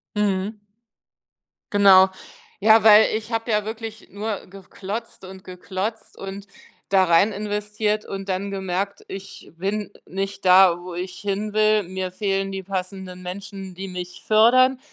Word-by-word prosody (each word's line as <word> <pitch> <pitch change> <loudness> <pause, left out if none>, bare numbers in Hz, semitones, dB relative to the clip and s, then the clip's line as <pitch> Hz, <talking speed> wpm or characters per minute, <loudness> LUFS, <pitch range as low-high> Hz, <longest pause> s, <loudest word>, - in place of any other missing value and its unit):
Mhm. 205 +1 -1 1.1
Genau. 195 -2 +7 0.5
Ja, 220 +1 +6
weil 215 0 +8
ich 220 +1 -5
habe 225 +1 -2
ja 210 -1 +2
wirklich 220 0 -7
nur 205 +1 -4
geklotzt 195 +3 -8
und 190 0 -11
geklotzt 190 +4 -6
und 195 +1 -8 0.4
da 195 -1 +4
rein 175 +4 +4
investiert 210 +1 -2
und 195 0 -6
dann 195 +1 -2
gemerkt, 195 0 -3
ich 195 0 -10
bin 200 +4 -3 0.2
nicht 195 +1 -4
da, 180 -1 +6
wo 180 -1 -8
ich 180 +1 -5
hinwill. 210 +1 +1
Mir 185 0 -5
fehlen 195 0 -1
die 195 0 -5
passenden 185 -1 -5
Menschen, 190 0 -8
die 195 +2 -6
mich 180 -1 -7
fördern. 250 +4 +5
195 Hz, 135 wpm, -23 LUFS, 190-210 Hz, 1.1 s, weil